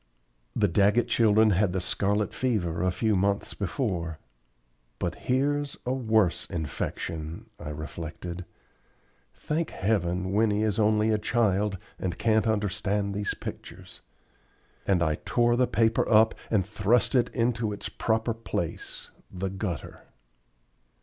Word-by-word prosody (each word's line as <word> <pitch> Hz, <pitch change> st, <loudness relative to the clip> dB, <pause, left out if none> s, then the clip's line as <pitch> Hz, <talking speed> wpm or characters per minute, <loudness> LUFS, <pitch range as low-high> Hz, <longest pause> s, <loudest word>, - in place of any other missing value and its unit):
The 105 Hz, -, +3 dB
Daggett 100 Hz, +6 st, +3 dB
children 110 Hz, -1 st, +4 dB
had 90 Hz, -, +2 dB
had 100 Hz, -4 st, +2 dB
the 95 Hz, -, 0 dB
scarlet 100 Hz, +3 st, 0 dB
fever 90 Hz, -10 st, 0 dB
a 90 Hz, -, +2 dB
few 110 Hz, +4 st, +1 dB
months 100 Hz, +2 st, 0 dB
before. 90 Hz, -, -2 dB, 0.8 s
"But 85 Hz, -1 st, -2 dB
here's 145 Hz, +5 st, 0 dB
a 125 Hz, -, 0 dB
worse 110 Hz, -8 st, +2 dB
infection," 80 Hz, -1 st, -4 dB
I -, -, -6 dB
reflected. 80 Hz, +4 st, -6 dB, 0.9 s
"Thank 160 Hz, +2 st, -2 dB
heaven, 95 Hz, -2 st, 0 dB
Winnie 105 Hz, 0 st, +2 dB
is 110 Hz, -1 st, 0 dB
only 110 Hz, 0 st, +3 dB
a 110 Hz, -, +2 dB
child, 105 Hz, -3 st, +1 dB, 0.2 s
and 90 Hz, -2 st, -2 dB
can't 110 Hz, 0 st, +2 dB
understand 105 Hz, -1 st, 0 dB
these 100 Hz, 0 st, -2 dB
pictures;" -, -, -8 dB, 0.9 s
and 90 Hz, -4 st, +3 dB
I 80 Hz, -2 st, 0 dB
tore 120 Hz, 0 st, +2 dB
the 125 Hz, 0 st, +3 dB
paper 115 Hz, 0 st, +2 dB
up 110 Hz, +1 st, +6 dB, 0.2 s
and 100 Hz, -5 st, +2 dB
thrust 105 Hz, +5 st, +2 dB
it 125 Hz, -3 st, +3 dB
into 115 Hz, -2 st, 0 dB
its 100 Hz, -, -4 dB
proper 115 Hz, +1 st, 0 dB
place, 115 Hz, +1 st, -4 dB, 0.2 s
the 95 Hz, 0 st, -3 dB
gutter. 90 Hz, -6 st, -5 dB
105 Hz, 130 wpm, -27 LUFS, 90-115 Hz, 0.9 s, up